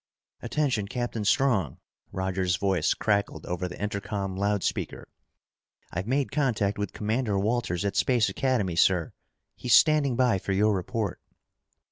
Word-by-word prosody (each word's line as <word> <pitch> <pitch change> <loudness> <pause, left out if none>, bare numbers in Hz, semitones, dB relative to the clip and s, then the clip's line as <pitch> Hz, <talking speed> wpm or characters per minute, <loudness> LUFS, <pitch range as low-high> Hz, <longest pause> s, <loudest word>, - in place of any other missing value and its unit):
"Attention, 120 -6 -1
Captain 120 -1 -3
Strong," 105 - +2 0.3
Roger's 95 -1 -1
voice 95 -3 +1
crackled 100 -1 -1
over 90 +1 -3
the 90 - -9
intercom 100 -1 -3
loud 100 0 0
speaker. - - -3 0.8
"I've 90 +4 -4
made 135 +2 0
contact 115 -8 0
with 100 -3 -2
Commander 110 -1 -1
Walters 105 -3 -1
at 100 - -1
Space 120 -4 +3
Academy, 120 -10 0
sir. 90 -2 +3 0.4
He's 125 - +3
standing 150 -5 +4
by 120 -6 +2
for 95 - -2
your 105 +2 +3
report." 100 +1 -3
105 Hz, 135 wpm, -27 LUFS, 95-120 Hz, 0.8 s, standing